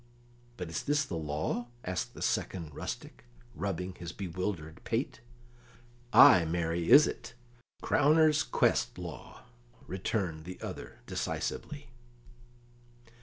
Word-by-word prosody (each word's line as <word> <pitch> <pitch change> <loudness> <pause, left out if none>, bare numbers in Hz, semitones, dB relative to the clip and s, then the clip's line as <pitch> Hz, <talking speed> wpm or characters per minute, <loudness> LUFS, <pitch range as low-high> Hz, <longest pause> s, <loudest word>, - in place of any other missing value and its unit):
"But 90 -3 -5
is 85 - -2
this 145 -3 0
law?" 80 +8 -2 0.2
asked 90 0 -3
the - - -5
second 85 -5 -2
rustic, 110 - -7 0.3
rubbing 95 -3 -3
his 85 -1 -7
bewildered 90 -3 -5
pate. 120 +5 -2 0.9
"Ay, 90 - +9
marry, 85 0 -1
is 150 - +9
it; - - -6 0.5
crowner's 155 +1 +4
quest - - +1
law," - - -9 0.4
returned 90 -4 -2
the 90 +1 -8
other - - -8
decisively. 145 - -4
90 Hz, 105 wpm, -31 LUFS, 80-120 Hz, 0.9 s, Ay